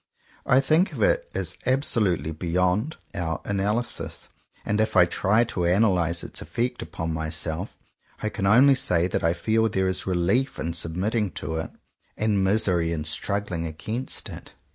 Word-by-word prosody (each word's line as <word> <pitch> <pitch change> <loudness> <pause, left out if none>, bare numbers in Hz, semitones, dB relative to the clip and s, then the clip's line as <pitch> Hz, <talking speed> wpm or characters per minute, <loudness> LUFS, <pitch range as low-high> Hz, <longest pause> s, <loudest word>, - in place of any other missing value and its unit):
I 125 - +5
think 160 +7 +2
of - - -1
it - - +1
as - - -2
absolutely 105 - +2
beyond 90 - 0 0.2
our 80 -3 -2
ana 100 0 0
lysis. 120 +2 -3 0.4
And 105 +1 +1
if 110 0 -1
I 90 - +8
try 105 +6 +2
to 90 -6 -2
analyze 90 -3 +2
its - - -6
effect 120 +10 -2
upon 80 0 -4
myself, 80 +3 -3 0.4
I 110 - -2
can 95 -2 -2
only 130 +7 +7
say 90 -9 +2
that 90 - -2
I 85 0 +3
feel 110 +5 +1
there 95 -2 0
is 95 +1 -1
relief 95 +9 +1
in 85 +2 -3
submitting 95 +6 -1
to 80 - -4
it, 80 - -3 0.5
and 105 -3 +1
misery 95 -4 +2
in 80 -2 -2
struggling 85 +2 -2
against 110 +11 -5
it. - - -10
95 Hz, 165 wpm, -25 LUFS, 85-110 Hz, 0.5 s, I